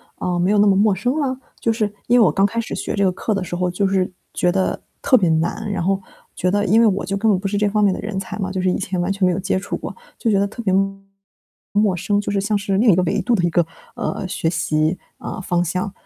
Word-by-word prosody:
啊， 180 -1 -2
没 180 +3 +2
有 210 - +3
那 205 - +5
么 195 - +4
陌 205 +1 +4
生 245 +8 -1
了？ 265 -3 0 0.2
就 230 - +1
是 215 -2 -1 0.2
因 245 +1 +5
为 - - +7
我 - - +4
刚 195 0 +3
开 230 +3 -1
始 - - -5
学 - - -3
这 200 - +1
个 185 - +3
课 215 +4 -2
的 195 -2 -1
时 175 - -5
候 180 0 0
就 195 +2 0
是 190 -1 0 0.2
觉 180 - +2
得 190 +1 0 0.2
特 255 - +5
别 185 - +2
难， 170 +7 0
然 195 - -2
后 195 +2 +1 0.4
觉 180 - 0
得 205 +1 +1
因 215 +4 +4
为 230 - +6
我 200 -1 0
就 195 +2 -2
根 220 +2 +2
本 185 - +2
不 195 - -3
是 205 +1 -1
这 210 0 +2
方 210 +1 +1
面 200 - +4
的 - - -5
人 205 -2 -3
才 195 +2 -6
嘛， 190 -2 -3
就 190 -1 -2
是 185 - +2
以 - - +1
前 185 -2 -2
完 175 +2 0
全 195 -1 +1
没 180 - +3
有 175 - -1
接 190 0 0
触 195 - -4
过， - - -7 0.2
就 230 - 0
觉 205 - +3
得 200 - +2
特 220 +3 -8
别 205 -5 0 1.0
陌 205 -2 +3
生， 205 +3 0
就 205 - -3
是 200 - +1
像 210 +2 0
是 200 -1 -1
另 220 +1 +5
一 170 - +4
个 185 - +3
维 175 - 0
度 245 - +1
的 180 - 0
一 175 - +3
个， 170 0 +2 0.3
呃， - - -3
学 175 - -2
习， 165 0 0 0.3
嗯， - - -5
方 175 -1 0
向。 185 +4 -2
195 Hz, 320 characters per minute, -20 LUFS, 180-210 Hz, 1.0 s, 为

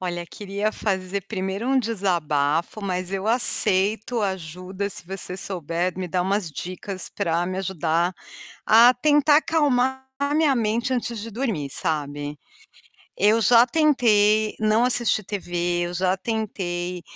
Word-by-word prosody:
Olha, 175 -2 -4
queria 205 +3 -3
fazer 190 -1 -2
primeiro 195 +2 -4
um 270 0 +3
desabafo, 175 - 0
mas 185 -1 -2
eu 195 +1 -3
aceito 220 -1 +1
ajuda 190 +1 -4
se 175 - -3
você 185 -1 -3
souber 175 -1 -2
me 185 - -3
dar 180 +1 0
umas 195 -2 -1
dicas 185 +4 -5
pra 170 +1 -1
me 185 - -4
ajudar 175 -1 -1 0.5
a 230 +3 +7
tentar 295 +2 +4
acalmar 265 -5 +1
a 280 +1 -1
minha 305 -3 +3
mente 235 +3 0
antes 240 -2 -2
de 230 +2 -7
dormir, 215 - -3
sabe. 145 -2 -3 0.8
Eu 210 +3 +3
já 235 +1 +6
tentei 220 -7 +3
não 215 +2 +3
assistir 235 -4 +1
TV, 175 -3 -2
eu 175 - -7
já 185 +1 +1
tentei, 180 -5 -3
195 Hz, 135 wpm, -23 LUFS, 175-230 Hz, 0.8 s, a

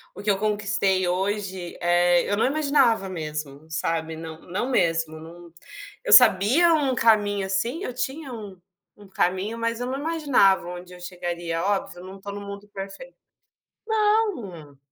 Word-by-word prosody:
O 200 - -9
que 210 - +2
eu 195 - 0
conquistei 205 -3 0
hoje, 190 -1 -3
eh, 175 0 +3
eu 205 - +1
não - - +2
imaginava 280 -8 +2
mesmo, 150 -4 -6
sabe, 160 0 -2
não 160 0 -9
não 190 +7 -3
mesmo, 165 -7 0
não 170 +1 -12 0.5
eu - - -2
sabia 250 - +6
um 285 -4 +1
caminho, 205 -4 +2
assim, 230 - -2
eu 250 - -4
tinha 265 +3 -4
um 205 -5 -9 0.4
um 205 -1 -16
caminho, 190 +4 -1
mas 230 0 -1
eu 245 - -3
não 265 +2 -3
imaginava 285 - +2
onde 180 0 -8
eu 180 - -12
chegaria. 175 -2 -4
Óbvio, 195 -2 -1
eu - - -11
não 190 +1 -10
estou 200 +1 -8
no 205 - -6
mundo 200 0 -9
perfeito 200 - -9 0.7
não. 410 - 0
195 Hz, 160 wpm, -24 LUFS, 175-235 Hz, 0.7 s, sabia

